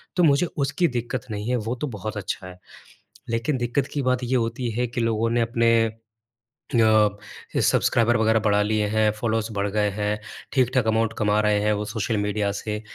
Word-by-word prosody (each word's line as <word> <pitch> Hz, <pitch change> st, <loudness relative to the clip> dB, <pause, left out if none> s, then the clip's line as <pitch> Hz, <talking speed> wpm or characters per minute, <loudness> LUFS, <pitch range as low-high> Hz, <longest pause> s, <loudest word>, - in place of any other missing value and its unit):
तो 180 Hz, -, +3 dB
मुझे 150 Hz, +1 st, +4 dB
उसकी 145 Hz, +5 st, +1 dB
दिक्कत 125 Hz, -1 st, -3 dB
नहीं 105 Hz, +2 st, -4 dB
है 125 Hz, -, +2 dB
वो 115 Hz, +1 st, -2 dB
तो 150 Hz, -, -1 dB
बहुत 110 Hz, -3 st, -5 dB
अच्छा 95 Hz, -1 st, -4 dB
है। 90 Hz, 0 st, -12 dB, 0.7 s
लेकिन 115 Hz, +5 st, 0 dB
दिक्कत 120 Hz, +3 st, -1 dB
की 145 Hz, -, -1 dB
बात 130 Hz, -1 st, 0 dB
ये 125 Hz, +2 st, 0 dB
होती 120 Hz, 0 st, -1 dB
है 125 Hz, -, +1 dB
कि 120 Hz, +1 st, -3 dB
लोगों 115 Hz, 0 st, +1 dB
ने 120 Hz, 0 st, +2 dB
अपने 115 Hz, 0 st, +2 dB, 1.0 s
अ, 110 Hz, -2 st, +5 dB, 0.5 s
सब्सक्राइबर 120 Hz, 0 st, +3 dB
वग़ैरह 110 Hz, 0 st, +3 dB
बढ़ा 105 Hz, -1 st, +2 dB
लिए 105 Hz, 0 st, 0 dB
हैं। 110 Hz, 0 st, +2 dB
फ़ॉलोअर्स 110 Hz, 0 st, -2 dB
बढ़ 100 Hz, 0 st, -1 dB
गए 105 Hz, 0 st, +1 dB
हैं। 105 Hz, +1 st, -2 dB, 0.3 s
ठीक-ठाक 130 Hz, -2 st, +2 dB
अमाउंट 110 Hz, 0 st, +1 dB
कमा 105 Hz, 0 st, +2 dB
रहे 105 Hz, -1 st, +2 dB
हैं 105 Hz, +1 st, +2 dB
वो 105 Hz, 0 st, -2 dB
सोशल 105 Hz, +1 st, -2 dB
मीडिया 105 Hz, 0 st, 0 dB
से। 105 Hz, -1 st, -4 dB
110 Hz, 190 wpm, -24 LUFS, 105-120 Hz, 1.0 s, अ